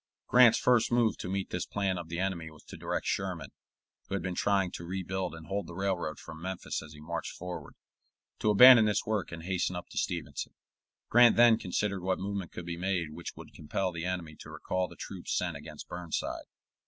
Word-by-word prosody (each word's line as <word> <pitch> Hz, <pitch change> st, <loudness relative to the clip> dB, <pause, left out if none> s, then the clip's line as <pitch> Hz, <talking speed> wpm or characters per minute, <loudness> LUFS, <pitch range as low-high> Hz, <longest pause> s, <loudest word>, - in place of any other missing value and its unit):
Grant's 120 Hz, -2 st, +7 dB
first 120 Hz, -2 st, +3 dB
move 120 Hz, -2 st, +3 dB
to -, -, -5 dB
meet 95 Hz, 0 st, -2 dB
this 90 Hz, -, -2 dB
plan 95 Hz, -3 st, -1 dB
of 85 Hz, -1 st, -8 dB
the 85 Hz, -, -4 dB
enemy 90 Hz, -3 st, -2 dB
was 75 Hz, -1 st, -16 dB
to -, -, -11 dB
direct -, -, -3 dB
Sherman, 90 Hz, -7 st, -2 dB, 0.6 s
who 100 Hz, -, -2 dB
had 95 Hz, -, -2 dB
been 95 Hz, 0 st, -2 dB
trying 95 Hz, -1 st, +1 dB
to -, -, -7 dB
rebuild 95 Hz, 0 st, -3 dB
and 80 Hz, -1 st, -10 dB
hold 95 Hz, +1 st, -3 dB
the 85 Hz, -, -9 dB
railroad 90 Hz, -5 st, -1 dB
from 80 Hz, 0 st, -10 dB
Memphis 95 Hz, 0 st, -4 dB
as 75 Hz, -, -11 dB
he 75 Hz, -, -12 dB
marched 85 Hz, +3 st, -4 dB
forward, 90 Hz, 0 st, -7 dB, 0.6 s
to 110 Hz, -, +1 dB
abandon 120 Hz, +2 st, +9 dB
this 105 Hz, -1 st, +1 dB
work 105 Hz, -4 st, -1 dB
and 80 Hz, -1 st, -7 dB
hasten 90 Hz, 0 st, -1 dB
up 90 Hz, -, -6 dB
to -, -, -3 dB
Stevenson. -, -, -3 dB, 0.5 s
Grant 120 Hz, 0 st, +7 dB
then 115 Hz, -1 st, +6 dB
considered 100 Hz, +1 st, -1 dB
what 95 Hz, +1 st, 0 dB
movement 100 Hz, -2 st, -4 dB
could 90 Hz, -, -7 dB
be 85 Hz, -1 st, -4 dB
made 90 Hz, -3 st, -1 dB
which 85 Hz, +2 st, -7 dB
would -, -, -12 dB
compel 90 Hz, +5 st, -2 dB
the 85 Hz, 0 st, -5 dB
enemy 90 Hz, -4 st, -3 dB
to -, -, -10 dB
recall 90 Hz, 0 st, -2 dB
the -, -, -13 dB
troops -, -, -4 dB
sent -, -, -1 dB
against -, -, -9 dB
Burnside. 90 Hz, -2 st, -4 dB
95 Hz, 210 wpm, -30 LUFS, 85-100 Hz, 0.6 s, abandon